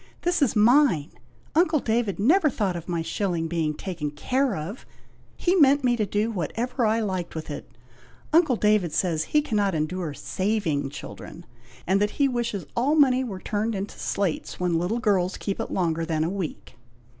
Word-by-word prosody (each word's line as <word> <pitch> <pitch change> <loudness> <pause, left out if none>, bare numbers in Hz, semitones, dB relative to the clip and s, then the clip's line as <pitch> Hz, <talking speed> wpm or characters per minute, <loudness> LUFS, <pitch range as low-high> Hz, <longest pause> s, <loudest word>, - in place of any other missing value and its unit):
this 350 -2 +1
is 275 - +2
mine! 220 - +4 0.4
Uncle 325 -1 +3
David 225 -4 0
never 305 - +4
thought 205 -8 -1
of 170 +1 -7
my 170 -2 -1
shilling 165 -1 -1
being 160 -2 -1
taken 170 -5 -4
care 255 - 0
of! 165 +10 -6 0.5
He 355 - +1
meant 285 -5 +5
me 245 -1 +3
to 215 -3 -1
do 210 +4 0
whatever 230 - -1
I 220 +1 +2
liked 185 -6 -3
with 160 - -5
it! - - -7 0.6
Uncle 315 -6 +5
David 210 -7 +2
says 165 -4 0
he 300 -1 +2
cannot 205 - 0
endure 155 0 -2
saving 185 -9 -1
children, - - -9 0.4
and 195 +2 +2
that 210 - +2
he 280 - +4
wishes 235 -7 -2
all 270 +6 +2
money 260 -4 +4
were 210 -7 -5
turned 215 +3 -2
into 195 +1 -5
slates, 195 -6 -2
when 175 -2 +1
little 180 +7 -1
girls 195 -6 +1
keep 200 - -3
it - - -3
longer 165 -3 0
than 160 -1 0
a 165 - 0
week." 185 -9 -6
205 Hz, 180 wpm, -25 LUFS, 170-245 Hz, 0.6 s, meant